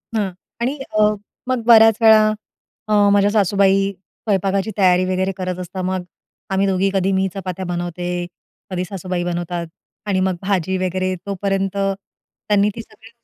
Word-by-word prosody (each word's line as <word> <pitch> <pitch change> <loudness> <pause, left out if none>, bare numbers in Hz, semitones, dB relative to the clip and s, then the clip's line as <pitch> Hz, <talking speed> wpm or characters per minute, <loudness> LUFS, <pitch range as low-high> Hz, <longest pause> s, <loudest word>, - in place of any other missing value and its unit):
हां. 200 -3 0 0.3
आणि 260 +5 -1 0.2
अ, 210 0 +4 0.3
मग 255 -2 -1
बऱ्याच 225 -2 +7
वेळा 220 -1 +7 0.7
अ, 215 - 0 0.2
माझ्या 205 0 +4
सासूबाई 195 -1 +3
स्वयंपाकाची 195 +1 -2
तयारी 185 -2 +4
वगैरे 185 +1 0
करत 185 -1 -3
असतात. 185 +1 -5
मग 185 0 -2 0.5
आम्ही 195 +1 +1
दोघी 190 0 +1
कधी 195 0 +1
मी 190 - +1
चपात्या 185 -1 -5
बनवते, 175 0 -4 0.6
कधी 180 -1 -2
सासूबाई 180 -1 -4
बनवतात 175 -1 -3 0.4
आणि 195 -2 +1
मग 185 -1 +1
भाजी 190 -2 0
वगैरे 185 0 -1
तोपर्यंत 195 0 -2
त्यांनी 200 +1 -2
ती 230 - -5
सगळी 225 0 -17
190 Hz, 145 wpm, -20 LUFS, 185-200 Hz, 0.7 s, बऱ्याच